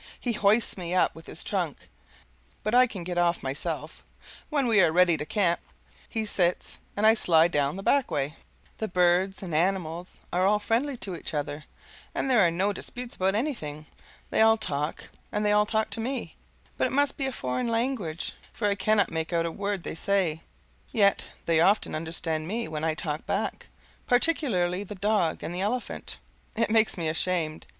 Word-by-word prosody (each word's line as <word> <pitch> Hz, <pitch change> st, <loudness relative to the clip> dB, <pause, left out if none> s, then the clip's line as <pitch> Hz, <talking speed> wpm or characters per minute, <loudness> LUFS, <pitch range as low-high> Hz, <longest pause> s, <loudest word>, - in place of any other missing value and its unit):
He 245 Hz, -, -1 dB
hoists 210 Hz, +1 st, +3 dB
me 175 Hz, 0 st, -3 dB
up 185 Hz, -, +3 dB
with 165 Hz, 0 st, -13 dB
his -, -, -3 dB
trunk, -, -, -2 dB, 0.8 s
but 215 Hz, -, -1 dB
I 250 Hz, +1 st, +7 dB
can 195 Hz, -7 st, -6 dB
get 175 Hz, 0 st, -2 dB
off 175 Hz, 0 st, +1 dB
myself; 135 Hz, +2 st, -4 dB, 0.5 s
when 285 Hz, -4 st, +1 dB
we 220 Hz, -4 st, +5 dB
are 170 Hz, -3 st, +4 dB
ready 175 Hz, 0 st, +5 dB
to 150 Hz, -1 st, -5 dB
camp, 175 Hz, -3 st, +1 dB, 0.5 s
he 220 Hz, -2 st, -2 dB
sits 180 Hz, -4 st, 0 dB, 0.2 s
and 210 Hz, -, +2 dB
I 220 Hz, -, +8 dB
slide 170 Hz, -6 st, +4 dB
down 145 Hz, 0 st, +1 dB
the 195 Hz, -, -6 dB
back 280 Hz, +3 st, +3 dB
way. 145 Hz, 0 st, -1 dB, 0.5 s
The 220 Hz, -, -1 dB
birds 180 Hz, +1 st, +2 dB
and 175 Hz, -4 st, -5 dB
animals 175 Hz, 0 st, -1 dB
are 180 Hz, +1 st, +2 dB
all 205 Hz, +2 st, +4 dB
friendly 240 Hz, +6 st, 0 dB
to 190 Hz, -5 st, -5 dB
each 165 Hz, -, -6 dB
other, 145 Hz, +1 st, -3 dB, 0.5 s
and 270 Hz, -, 0 dB
there 240 Hz, -4 st, +6 dB
are 170 Hz, -, +5 dB
no 190 Hz, +5 st, 0 dB
disputes 245 Hz, +5 st, -6 dB
about 190 Hz, +1 st, +1 dB
anything. 160 Hz, -, -3 dB, 0.5 s
They -, -, +3 dB
all 225 Hz, 0 st, +6 dB
talk, 150 Hz, -7 st, -3 dB, 0.2 s
and 210 Hz, 0 st, -1 dB
they 210 Hz, -, +3 dB
all 210 Hz, 0 st, +4 dB
talk 220 Hz, 0 st, 0 dB
to -, -, -5 dB
me, 250 Hz, +3 st, -3 dB, 0.4 s
but -, -, +3 dB
it -, -, -5 dB
must 285 Hz, 0 st, +2 dB
be 270 Hz, -, -1 dB
a -, -, -2 dB
foreign 125 Hz, -, -2 dB
language, 230 Hz, -8 st, -1 dB, 0.2 s
for 210 Hz, -, -1 dB
I 200 Hz, -, +3 dB
cannot 200 Hz, +1 st, +2 dB
make 160 Hz, 0 st, -2 dB
out 170 Hz, -1 st, +1 dB
a 165 Hz, -, -2 dB
word 200 Hz, 0 st, -3 dB
they -, -, -4 dB
say; 175 Hz, -3 st, 0 dB, 0.5 s
yet 200 Hz, -4 st, +3 dB, 0.2 s
they 165 Hz, -1 st, +3 dB
often 195 Hz, +6 st, +3 dB
understand 160 Hz, 0 st, -2 dB
me 230 Hz, +5 st, -2 dB
when 155 Hz, -1 st, -4 dB
I 160 Hz, -1 st, +1 dB
talk 155 Hz, 0 st, -4 dB
back, 200 Hz, +1 st, -2 dB, 0.4 s
particularly 240 Hz, -, +2 dB
the 205 Hz, +1 st, -8 dB
dog 200 Hz, -4 st, +1 dB
and 170 Hz, -, -4 dB
the 180 Hz, -, -2 dB
elephant. 230 Hz, +5 st, -2 dB, 0.4 s
It 225 Hz, -1 st, +1 dB
makes 220 Hz, -2 st, +3 dB
me 165 Hz, -2 st, -1 dB
ashamed. 160 Hz, -1 st, -1 dB
190 Hz, 190 wpm, -27 LUFS, 165-220 Hz, 0.8 s, I